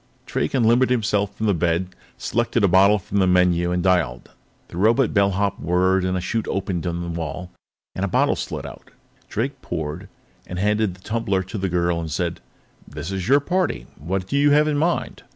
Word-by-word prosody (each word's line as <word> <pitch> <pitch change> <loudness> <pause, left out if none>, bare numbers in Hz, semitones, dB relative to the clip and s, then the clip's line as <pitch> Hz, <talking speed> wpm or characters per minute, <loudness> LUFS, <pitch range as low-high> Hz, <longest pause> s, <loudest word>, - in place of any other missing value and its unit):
Drake - - -2
unlimbered 120 +1 +4
himself 105 -5 0
from 110 - -3
the 105 - +3
bed, 85 +1 0 0.3
selected 115 -1 0
a - - +6
bottle 95 +3 +5
from 100 +1 -2
the 95 - +3
menu 90 -1 +3
and 90 0 0
dialed. 90 -10 0 0.4
The - - -9
robot 115 +6 +3
bellhop 100 -1 +1
whirred, 90 +2 +2
a 95 0 0
chute 110 +5 -2
opened 95 -3 -2
in 85 0 -2
the - - -5
wall, 85 +2 -5 0.4
and 95 - -4
a - - +1
bottle - - +2
slid - - -5
out. - - -11 0.4
Drake 130 +4 -3
poured, 80 +5 -5 0.4
handed 105 +1 0
the 90 - -20
tumbler 105 -4 -1
to 95 +5 -7
the 95 0 -1
girl, 85 -1 0
and 80 -1 -4
said: 85 +2 -2 0.5
"This 80 +4 -6
is 95 -1 -3
your 140 +3 +5
party; 175 - -1
what 90 +5 -3
do 95 - -4
you 145 +1 +4
have 150 +1 +4
in 150 -1 +1
mind?" 170 +3 -1
95 Hz, 190 wpm, -22 LUFS, 90-110 Hz, 0.5 s, a